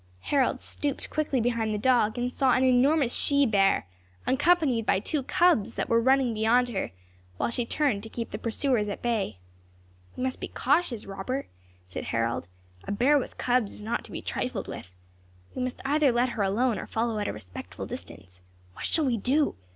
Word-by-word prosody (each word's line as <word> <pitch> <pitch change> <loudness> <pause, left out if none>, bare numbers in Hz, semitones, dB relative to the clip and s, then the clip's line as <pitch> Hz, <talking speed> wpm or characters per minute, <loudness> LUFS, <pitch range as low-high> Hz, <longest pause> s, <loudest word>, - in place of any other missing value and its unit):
Harold 265 - +1
stooped 285 +1 -4
quickly 295 -4 0
behind 230 -2 0
the 210 - -1
dog, 235 -1 +2
and 245 +1 -1
saw 265 -3 +3
an 255 - +3
enormous 260 +1 +4
she 280 -1 +3
bear, 195 - +3 0.4
accompanied 270 -3 +3
by 200 - +2
two 290 +8 -1
cubs 300 - +2
that - - -2
were 230 0 +4
running 260 -1 +3
beyond 230 +3 +3
her, 200 -5 -2 0.5
while - - 0
she 235 0 -2
turned 275 -9 +1
to 225 - -8
keep 230 +1 -5
the 210 - -4
pursuers 230 -1 +1
at 205 - -5
bay. 225 - -1 0.8
"We - - -2
must 260 0 -2
be - - -3
cautious, 275 -5 0
Robert," 200 +8 -4 0.4
said 90 - -6
Harold; 115 -5 -1 0.4
"a - - -2
bear 260 +8 +4
with - - -7
cubs 245 -4 +1
is 210 - -9
not 225 +2 -2
to - - -13
be - - -6
trifled - - -3
with. 95 - -8 0.6
We - - -4
must 250 0 -3
either 290 0 +3
let 240 +2 +2
her 230 - -3
alone, 220 +4 +1
or - - -6
follow 225 -1 -1
at 205 - -1
a - - -1
respectful 90 -4 -8
distance. 90 +1 -9 0.3
What - - -6
shall 315 - +1
we 245 -3 +1
do? 275 +8 +2
245 Hz, 190 wpm, -27 LUFS, 210-270 Hz, 0.8 s, enormous